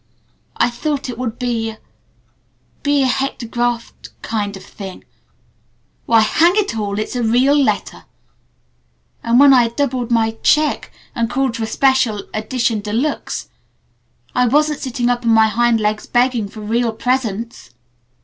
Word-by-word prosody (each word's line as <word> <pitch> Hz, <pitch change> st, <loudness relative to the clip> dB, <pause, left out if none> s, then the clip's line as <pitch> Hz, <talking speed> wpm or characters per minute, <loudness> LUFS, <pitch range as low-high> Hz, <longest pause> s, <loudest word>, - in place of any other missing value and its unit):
"I 245 Hz, -, +2 dB
thought 275 Hz, +2 st, -3 dB
it 240 Hz, -, -6 dB
would 240 Hz, -2 st, -3 dB
be 235 Hz, -3 st, -2 dB
a 220 Hz, -, -9 dB, 1.0 s
be 285 Hz, -1 st, +2 dB
a -, -, +2 dB
hectographed 240 Hz, -3 st, -2 dB
kind 205 Hz, -3 st, -3 dB
of 190 Hz, -, -13 dB
a -, -, -17 dB
thing. 195 Hz, -3 st, -9 dB, 1.0 s
Why, 230 Hz, -1 st, +5 dB
hang 330 Hz, +11 st, +3 dB
it 415 Hz, -, 0 dB
all, 205 Hz, -2 st, -3 dB
it's 215 Hz, +4 st, -3 dB
a 245 Hz, -, -1 dB
real 245 Hz, +5 st, +3 dB
letter! 285 Hz, -2 st, 0 dB, 1.2 s
And 235 Hz, +2 st, +3 dB
when 280 Hz, -1 st, +8 dB
I 245 Hz, -2 st, +5 dB
doubled 250 Hz, 0 st, -2 dB
my 225 Hz, -2 st, +2 dB
check 305 Hz, 0 st, +2 dB, 0.2 s
and 230 Hz, -1 st, -1 dB
called 260 Hz, -1 st, 0 dB
for 225 Hz, -, -2 dB
a -, -, -6 dB
special 250 Hz, -6 st, +1 dB
edition 225 Hz, +1 st, -1 dB
de 205 Hz, 0 st, -6 dB
luxe 275 Hz, +7 st, -2 dB, 0.8 s
I 250 Hz, -1 st, +2 dB
wasn't 300 Hz, +4 st, +2 dB
sitting 245 Hz, -2 st, -2 dB
up 245 Hz, 0 st, 0 dB
on 230 Hz, -, +1 dB
my 220 Hz, 0 st, +5 dB
hind 235 Hz, +1 st, +2 dB
legs 215 Hz, 0 st, -1 dB
begging 240 Hz, -3 st, +1 dB
for 215 Hz, +2 st, -11 dB
real 230 Hz, +2 st, 0 dB
presents!" 230 Hz, -, -2 dB
240 Hz, 155 wpm, -18 LUFS, 220-260 Hz, 1.2 s, when